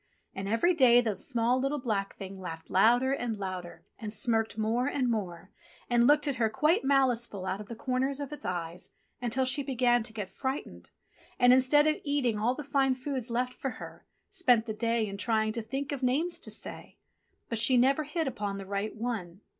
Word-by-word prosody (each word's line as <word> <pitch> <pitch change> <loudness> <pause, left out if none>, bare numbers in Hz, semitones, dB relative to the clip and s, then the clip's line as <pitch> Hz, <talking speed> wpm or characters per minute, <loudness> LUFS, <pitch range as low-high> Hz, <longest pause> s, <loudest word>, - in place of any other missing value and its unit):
And 195 0 -5
every 230 - +3
day 250 -6 +6
the 225 -4 0
small, 235 +5 0
little, 275 +3 0
black 215 -7 -2
Thing 195 0 -8
laughed 165 -3 -8
louder 245 +7 +4
and 240 -5 -2
louder 185 -3 -6
and 215 -2 -5
smirked 225 0 +1
more 225 +4 0
and 260 -4 0
more, 185 -4 -4 0.4
and 240 0 +4
looked 295 +1 +4
at 275 -3 -1
her 225 -2 +2
quite 300 - +2
maliceful 245 -7 +1
out 190 +2 -2
of 210 - -10
the 235 - -7
corners 265 +3 -1
of 285 -1 -5
its 295 - -7
eyes 175 -1 -4 0.3
until 245 +2 0
she 265 +3 +1
began 245 -3 +2
to 220 +1 -7
get 210 -4 -6
frightened, 270 +1 -5 0.5
and 245 0 +6
instead 260 +3 +5
of 310 0 +2
eating 275 -7 0
all 240 +4 +1
the 300 - -6
fine 270 -2 +1
foods 260 -2 -4
left 250 +2 -1
for 270 - -4
her, - - -10 0.3
spent 250 - +3
the 220 - -3
day 230 +1 0
in 200 -1 -6
trying 220 0 +1
to 230 - -3
think 270 +6 -4
of 280 -2 -4
names 290 +8 0
to - - -4
say. - - -6 0.5
But 230 - -3
she 250 +3 +5
never 270 +5 +4
hit 305 +1 -2
upon 205 -6 -3
the 195 - -7
right 200 +2 -3
one. 215 -6 -4
240 Hz, 200 wpm, -29 LUFS, 215-270 Hz, 0.5 s, day